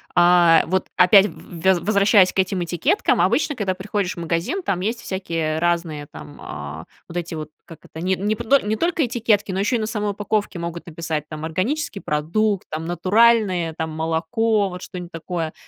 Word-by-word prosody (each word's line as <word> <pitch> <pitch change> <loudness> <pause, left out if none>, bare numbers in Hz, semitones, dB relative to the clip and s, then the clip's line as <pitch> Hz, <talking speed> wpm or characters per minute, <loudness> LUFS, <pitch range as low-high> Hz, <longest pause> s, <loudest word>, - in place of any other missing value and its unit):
А, 175 -1 +6
вот 185 +2 0
опять, 195 +2 +6
в - - -11
в 170 -3 -11
вез 190 -2 +4
возвращаясь 200 +1 +4
к - - -2
этим 190 -1 0
этикеткам, 175 - +1
обычно, 295 -1 +1
когда 195 -6 -1
приходишь 195 0 -3
в - - -8
магазин, 170 - -2
там 190 - -1
есть 225 +5 -2
всякие, 165 -5 -2
э, - - -1
разные 165 -3 -1
там, 145 - -11
а, 75 +1 -7 0.2
вот 175 - -7
эти 170 -1 -4
вот, 155 -1 -6 0.2
как 165 - -12
это? 160 - -8
Не 190 +1 +1
не 205 +4 -1
пто 235 +5 +3
не 210 -1 -2
только 330 +4 +1
этикетки, 225 -4 0
но 190 - -2
еще 210 +5 +1
и - - +1
на 215 - -1
самой 210 -2 -2
упаковке 205 -1 -2
могут 170 0 -6
написать 160 -2 -4
там, 155 0 -6
"органический 200 - -2
продукт", 185 +7 0
там 160 +1 -4
"натуральное", 185 -1 +3
там, 160 -1 -3
молоко, 165 +7 0
вот 180 0 -8
что-нибудь 180 -2 -8
такое. 165 -1 -4
180 Hz, 195 wpm, -21 LUFS, 165-210 Hz, 0.2 s, А